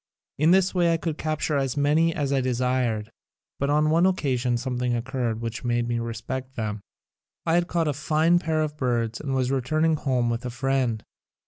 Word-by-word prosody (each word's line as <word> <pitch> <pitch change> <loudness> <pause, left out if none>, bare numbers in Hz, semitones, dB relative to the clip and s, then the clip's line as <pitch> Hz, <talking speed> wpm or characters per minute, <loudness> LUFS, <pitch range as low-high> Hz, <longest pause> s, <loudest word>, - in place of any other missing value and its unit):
In 155 +2 +4
this 190 +1 +4
way 175 -2 +3
I 165 - +1
would 160 -2 -2
capture 155 -1 -1
as 135 -1 -1
many 150 +4 +3
as 145 -4 -1
I 135 - +2
desired. 125 -3 0 0.5
But 140 - 0
on 150 +1 +3
one 170 +3 +4
occasion 125 -9 0
something 125 -1 -1
occurred 120 -2 -2
which 115 -1 -4
made 120 -1 0
me 120 -1 -1
respect 120 +3 -5
them. 105 -3 -3 0.6
I 165 - +1
had 175 0 +2
caught 170 -3 0
a 150 - +1
fine 155 +4 +2
pair 160 -2 0
of 150 -1 -4
birds 120 -4 -1
and 135 -3 -2
was 130 0 0
returning 155 +5 +1
home 130 -4 0
with 115 +1 -3
a 125 - -3
friend. 125 -3 -1
135 Hz, 195 wpm, -25 LUFS, 120-155 Hz, 0.6 s, In